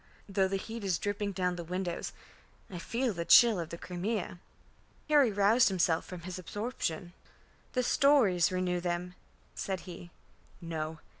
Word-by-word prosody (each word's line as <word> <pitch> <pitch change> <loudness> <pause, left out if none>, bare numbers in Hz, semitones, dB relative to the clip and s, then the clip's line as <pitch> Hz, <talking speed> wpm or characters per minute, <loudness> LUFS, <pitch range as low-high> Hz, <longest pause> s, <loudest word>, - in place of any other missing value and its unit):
"Though 195 -1 +1
the 195 - -2
heat 225 +3 -7
is 185 -4 +1
dripping 205 +1 -2
down 180 -1 -1
the 170 - -5
windows, 180 +1 -3 0.6
I 180 - -6
feel 230 +6 -1
the 170 -2 -3
chill 225 +2 +7
of 165 -2 -4
the 170 - -6
Crimea." 180 +1 -4 0.7
Harry 290 -6 +5
roused 205 +5 +4
himself 175 -3 +1
from 180 -2 -8
his 185 +1 -6
absorption. 185 -4 -4 0.6
"The 255 - +1
stories 240 - +4
renew 180 -1 0
them," 175 0 -3 0.4
said 190 -2 -3
he. 175 -1 -10 0.5
"No. 160 -2 -5
185 Hz, 150 wpm, -31 LUFS, 175-210 Hz, 0.7 s, chill